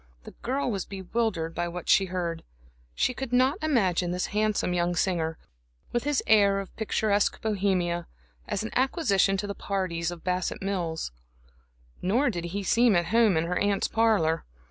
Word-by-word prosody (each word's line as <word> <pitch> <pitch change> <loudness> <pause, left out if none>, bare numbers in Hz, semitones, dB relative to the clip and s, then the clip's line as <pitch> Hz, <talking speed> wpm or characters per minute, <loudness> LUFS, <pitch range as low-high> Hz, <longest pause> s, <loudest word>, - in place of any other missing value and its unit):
The - - -10
girl 260 +1 -1
was 195 -4 -2
bewildered 190 -3 -2
by 175 - -2
what 175 0 -7
she 195 - +5
heard. 175 -3 -3 0.5
She - - +1
could 265 -1 -5
not 260 +8 +2
imagine 190 - +1
this 180 +1 -1
handsome 210 -3 +1
young 175 0 0
singer, 165 -3 0 0.5
with 240 +1 -1
his 290 -2 +1
air 200 -2 +4
of 195 - -8
picturesque 210 -2 +1
Bohemia, 185 -5 0 0.4
as 200 - -2
an 220 - -5
acquisition 230 - +2
to 200 - -3
the 200 - -4
parties 185 -5 -2
of 175 -1 -8
Bassett 180 0 -1
Mills; 175 - -2 0.9
nor 240 +8 +2
did 175 -3 -4
he 195 +4 -4
seem 230 +2 +4
at 175 -1 +1
home 225 -6 +5
in 160 - +1
her 180 +1 -1
aunt's 205 -1 +1
parlor. 205 -8 +2
195 Hz, 165 wpm, -27 LUFS, 175-220 Hz, 0.9 s, she